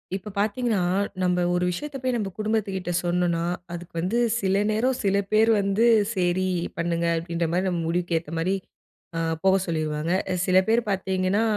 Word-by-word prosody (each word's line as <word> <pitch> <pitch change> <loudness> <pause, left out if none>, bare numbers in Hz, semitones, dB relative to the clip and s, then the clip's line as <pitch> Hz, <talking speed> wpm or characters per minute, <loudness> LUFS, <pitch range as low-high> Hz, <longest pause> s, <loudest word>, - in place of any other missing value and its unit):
இப்போ 195 +2 -6
பாத்தீங்கன்னா, 215 +1 +1 0.4
நம்ப 180 -1 +2
ஒரு 180 0 +1
விஷயத்த 275 +11 -4
போய் 255 -1 0
நம்ப 210 -4 -2
குடும்பத்துகிட்ட 210 -4 -1
சொன்னோன்னா, 175 -1 0 0.3
அதுக்கு 175 0 -8
வந்து 185 +8 0 0.2
சில 195 0 +2
நேரம் 245 +4 +1
சில 195 -1 +2 0.2
பேர் 220 +1 +4
வந்து 200 +3 +2 0.3
"செரி 180 0 +1 0.3
பண்ணுங்க" 170 0 0
அப்டின்ற 170 0 -2
மாரி, 180 +2 +1
நம்ம 175 -2 -1
முடிவுக்கு 170 0 0
ஏத்த 160 -2 -12
மாரி 185 +4 +1 0.6
ஆ - - 0 0.2
போக 190 0 +5
சொல்லிருவாங்க. 155 -1 -2 0.2
அ - - +1
சில 185 -1 +3
பேர் 230 +2 +3
பாத்தீங்கன்னா, 190 +2 0
185 Hz, 160 wpm, -25 LUFS, 175-210 Hz, 0.6 s, போக